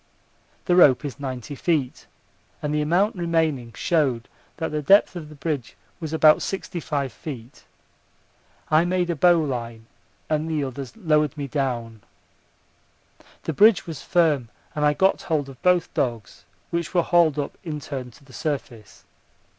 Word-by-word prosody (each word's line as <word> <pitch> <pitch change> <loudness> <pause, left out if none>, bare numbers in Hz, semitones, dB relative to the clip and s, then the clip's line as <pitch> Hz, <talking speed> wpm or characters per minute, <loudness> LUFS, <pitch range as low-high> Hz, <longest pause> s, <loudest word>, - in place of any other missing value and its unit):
The 175 - +3
rope 150 -7 +6
is 140 0 -6
90 130 0 -5
feet, 145 -3 -1 0.5
and 150 0 -3
the 150 - +1
amount 180 +8 +2
remaining 160 -8 0
showed 135 -8 0 0.3
that 160 0 -3
the 150 0 -1
depth 195 +6 +5
of 160 -4 -7
the 155 - -12
bridge 145 -4 -4 0.2
was 160 -3 -5
about 155 -1 +5
65 150 - -3
feet. 125 -5 -9 1.1
I 155 +2 +5
made 175 0 0
a - - -2
bowline 130 -9 +1 0.4
and 155 +1 -1
the 155 -3 0
others 135 - -6
lowered 155 - +1
me 140 -1 -4
down. 120 -6 -3 1.4
The 160 - -2
bridge 210 +4 +5
was 160 -5 -7
firm 155 -9 +2 0.2
and 150 - -2
I 150 0 +4
got 190 +4 +2
hold 150 -4 -1
of 130 - -13
both 180 -2 +2
dogs, 115 -5 -3 0.3
which 170 +1 -3
were 175 - +4
hauled 170 -4 +3
up 145 - -3
in 155 -3 -4
turn 130 -4 -6
to 125 +4 -19
the 130 - -17
surface. 120 -10 -5
150 Hz, 155 wpm, -24 LUFS, 130-165 Hz, 1.4 s, rope